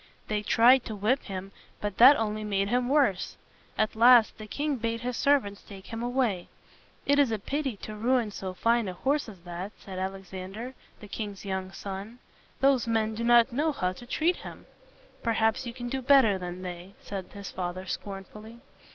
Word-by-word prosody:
They 210 -1 0
tried 240 +4 +5
to 220 - -5
whip 220 +7 +1
him, 195 0 -6 0.3
but 205 -2 -4
that 260 +5 +10
only 215 -2 -2
made 200 -1 0
him 245 +1 +1
worse. 265 -11 +2 0.4
At 215 0 +1
last 235 0 +6
the 215 - -8
king 290 +3 -2
bade 230 0 -2
his 250 0 -3
servants 230 -8 +2
take 195 -2 -12
him 225 0 -6
away. 240 -7 0 0.6
"It 285 +1 +3
is 275 -5 +4
a 220 - 0
pity 270 +2 -3
to 215 - -6
ruin 235 0 +1
so 190 -2 -6
fine 230 +1 +2
a 185 - -3
horse 275 +7 0
as 190 -5 -13
that," 175 +4 -6
said 190 -2 -8
Al 190 +1 -2
ex 195 -1 -13
an´der, 195 +7 -6 0.3
the 210 - -9
king's 205 -1 -6
young 190 -1 -3
son. 200 +4 -7 0.4
"Those 270 -3 +3
men 220 -1 +1
do 225 +2 -4
not 240 +1 +5
know 305 +5 +1
how 185 -9 -1
to 240 +6 -12
treat 330 +7 +1
him." - - -10 0.6
"Perhaps 225 +2 +1
you - - -3
can 245 0 -6
do 265 +2 -2
better 255 -7 +5
than 180 0 -6
they," 180 +1 -8
said 195 -2 -5
his 200 -2 -7
father 185 0 -4
scorn 195 +1 -5
ful 210 +2 -13
ly. 220 +2 -11
220 Hz, 200 wpm, -28 LUFS, 195-245 Hz, 0.6 s, that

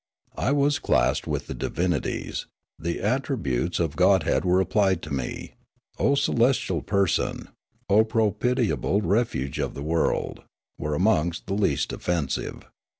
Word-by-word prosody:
I 135 - +1
was 145 0 +2
classed - - +1
with - - -2
the - - -5
divinities; 85 -3 -2 0.3
the 85 +2 -3
attributes 105 - -1
of 80 -4 -1
godhead - - +3
were 90 +1 +3
applied 95 -2 +2
to 80 - -5
me. 65 -3 -4 0.2
" - - -36
O 140 - +3
celestial 130 -1 +1
person," 100 -3 0 0.2
" - - -42
O 105 +2 +5
propitiable 110 -1 +1
refuge 85 - 0
of - - -2
the 70 - -5
world," 80 +2 0 0.4
were 75 0 -2
amongst 85 -2 +1
the 95 - -3
least 100 +1 0
offensive. 85 -6 -2
95 Hz, 140 wpm, -25 LUFS, 80-115 Hz, 0.4 s, O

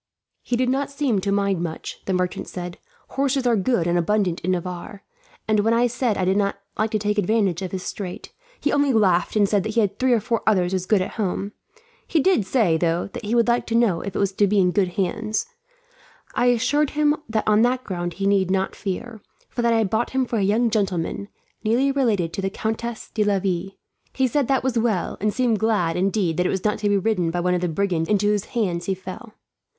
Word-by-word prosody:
"He 245 - -2
did 250 +1 +1
not 275 +2 0
seem 275 -8 0
to 200 - -1
mind 200 -3 +1
much," 165 -2 -5
the 190 - -1
merchant 180 0 -1
said. 175 -1 -7 0.3
"Horses 275 -1 0
are 240 -1 +4
good 200 -3 +1
and 175 0 +2
abundant 185 -1 0
in 180 - -3
Navarre, 180 +2 -4 0.4
and 215 -1 +3
when 225 +3 +3
I 240 +1 +3
said 245 -2 0
I 185 - 0
did 190 +2 +2
not 200 -1 0 0.2
like 215 +1 0
to 215 - 0
take 210 0 0
advantage 200 -3 +1
of 185 - -4
his 185 -1 -4
strait, 185 -4 -6 0.3
he 295 - 0
only 285 -2 +3
laughed 190 -5 +2
and 205 -2 +4
said 200 -2 +1
he 220 +2 0
had 205 -2 0
three 255 -1 +3
or 235 - +3
four 230 +2 -1
others 185 -4 +2
as 185 -1 -2
good 205 -4 +3
at - - -8
home. 200 +1 -2 0.6
He 325 - +2
did 290 - +2
say, 190 -9 +2
though, 170 +3 0
that 245 -1 -6
he 220 +3 0
would 235 0 +3
like 240 0 +1
to 230 - -1
know 225 -8 +3
if 200 -1 -6
it - - 0
was 200 -1 +1
to 200 +1 +2
be 205 +2 +1
in 180 -1 +3
good 195 0 +2
hands. 215 - -1 0.9
I 245 - +2
assured 270 +5 +2
him 300 0 +4
that 220 -1 -1
on 215 0 +4
that 250 +2 +2
ground 175 -2 -4
he 195 - -3
need 195 -2 +2
not 190 0 0
fear; 215 +3 -5 0.3
for 240 - -3
that 235 0 +2
I 230 - +3
had 220 -4 0
bought 235 +4 -1
it 260 -1 +1
for 230 - -1
a - - +1
young 220 +4 +2
gentleman, 200 -2 -1 0.4
nearly 245 +5 +2
related 215 -12 +1
to - - -3
the 195 - -1
Countess 220 +3 -4
de 215 - +1
Laville. 195 -2 -1 0.4
He 265 - +1
said 275 +1 0
that 270 -2 +1
was 250 -3 +1
well, 220 -6 0
and 210 +1 +2
seemed 235 -1 +1
glad, 205 -7 +1
indeed, 185 -2 0
that 180 0 +2
it - - -1
was 190 +1 -2
not 210 - +1
to 210 -1 0
be 205 - +3
ridden 190 -4 0
by 175 +2 -2
one 180 +1 +1
of 180 - 0
the 180 - 0
brigands 170 -2 -1
into 205 -1 +2
whose 205 -1 +1
hands 180 -8 -2
he 195 - 0
fell." 190 +4 -10
205 Hz, 240 wpm, -23 LUFS, 185-235 Hz, 0.9 s, are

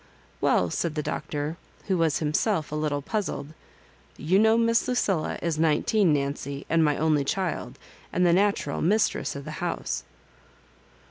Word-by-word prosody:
" - - -32
Well," 90 -2 +2
said 165 - -2
the 150 - -1
Doctor, 150 +2 -3 0.3
who 195 - +1
was 165 -4 +2
himself 155 +2 0
a - - -3
little 150 -2 -1
puzzled, 155 -7 -3 0.6
"you 180 +6 +2
know 220 +1 +5
Miss 230 0 +2
Lucilla 195 -10 0
is 165 -2 -1
nme 160 -2 +2
teen, 205 -6 +3
Nancy, 140 -1 -2
and 165 -1 +4
my 150 -2 +2
only 155 -2 +2
child, 180 +4 -2 0.3
and 180 - +2
the 170 - +5
natural 195 -6 +1
mistress 210 -1 +1
of 140 0 -7
the 155 - -6
house." 175 - -2
160 Hz, 160 wpm, -26 LUFS, 145-190 Hz, 0.6 s, know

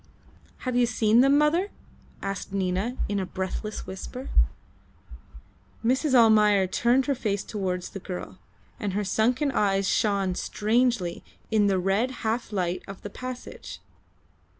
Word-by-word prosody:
"Have 255 -1 -1
you 245 -1 +4
seen 225 0 +4
them, 275 +2 +5
mother?" 330 +7 +2 0.5
asked 195 -1 -4
Nina, 195 +5 -1
in 205 -1 -1
a 190 - -1
breathless 190 +3 -4
whisper. 220 +7 -7 1.5
Mrs. 265 +3 +2
Almayer 210 -4 +6
turned 245 +7 +2
her 285 - +1
face 205 -6 -2
towards 185 -4 -3
the 195 - -6
girl, 180 -1 -7 0.4
and 205 -3 -2
her 205 +2 0
sunken 245 +8 +1
eyes 195 -4 +1
shone 200 -4 +1
strangely 215 -2 0 0.3
in 210 -2 +4
the 195 -1 +2
red 195 +7 +1 0.2
half 225 +1 -1
light 180 -3 -1
of 195 -1 -9
the 205 - -6
passage. 255 +2 -7
210 Hz, 135 wpm, -26 LUFS, 195-245 Hz, 1.5 s, Almayer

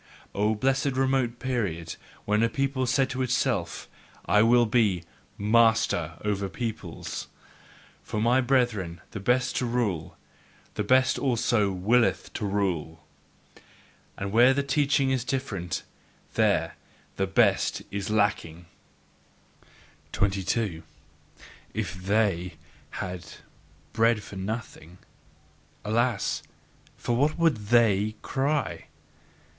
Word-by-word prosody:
O 105 +2 +1
blessed 135 +3 0
remote 130 -3 +1
period 100 -12 -2 0.3
when 105 +1 +2
a 115 - +3
people 135 +1 -1
said 135 +2 +2
to 130 - -3
itself: 125 -7 -1 0.4
"I 105 - +4
will 120 +2 +5
be 105 -6 +2 0.3
MASTER 110 -7 +2
over 100 -2 -1
peoples!" 110 -8 -5 0.7
For, 105 - -4
my 120 +4 +3
brethren, 120 -10 0
the 105 - -5
best 125 +5 +1
shall 125 - 0
rule, 105 -10 -2 0.6
the - - -2
best 130 +4 +3
also 120 -5 +1
WILLETH 110 +6 +1
to 105 - -3
rule! 90 -6 -2 1.1
And 100 0 -4
where 120 +5 +6
the 140 - +1
teaching 140 -1 +2
is 130 -3 0
different, 115 -10 -3 0.5
there - - +1 0.4
the 95 - 0
best 95 - +2
is 100 -1 -3
LACKING. 95 -6 0 1.5
22. 100 -2 0 0.9
If - - -2
THEY 95 -2 0 0.3
had 90 -2 -5 0.7
bread 115 -1 +2
for - - -10
nothing, 95 -4 -6 0.9
alas! 115 +1 0 0.6
for 120 - -1
what 145 +5 +1
would 145 -12 +1
THEY 110 -2 +3
cry! 145 +2 -1
110 Hz, 105 wpm, -27 LUFS, 95-125 Hz, 1.5 s, where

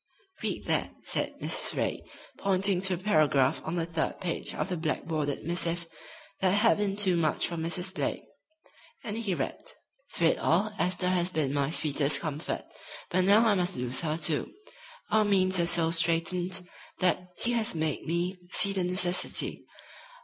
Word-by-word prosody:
"Read - - -3
that," - - -1
said - - -1
Mrs. - - +2
Ray, - - -2 0.3
pointing 195 -1 +2
to 190 -1 0
a - - -7
paragraph 155 -8 +2
on 160 - -4
the 165 -2 -1
third 165 -1 -3
page 175 -3 -2
of - - -3
the 180 - -2
black 160 -2 -2
bordered 150 -3 -3
missive 170 0 -1 0.5
that 190 - +2
had 210 +2 +3
been 200 -1 -1
too 195 -3 +3
much 160 -2 +1
for 170 - -5
Mrs. 175 +3 -1
Blake. - - -3 0.8
And 210 -2 -5
he 220 -5 -2
read: - - -4 0.5
"Through 170 -3 +2
it - - -1
all 200 +6 +1
Esther 180 0 +1
has 180 -1 +1
been 155 -6 -2
my 140 -1 0
sweetest 150 -2 +2
comfort, 155 -1 -4 0.5
but 185 +1 +2
now 210 +4 +5
I 220 - +4
must 185 -1 -1
lose 125 +1 -1
her, 155 -1 -2
too. 155 -2 0 0.6
Our 220 0 +4
means 190 -2 +2
are 170 - +2
so 165 -1 +4
straitened 175 +2 +1 0.3
that 180 0 -1
she 240 - +4
has 225 -6 0
made 155 -2 -3
me 175 +3 -2
see 200 +2 +2
the 190 -2 -1
necessity. 180 0 +3
175 Hz, 170 wpm, -28 LUFS, 160-190 Hz, 0.8 s, now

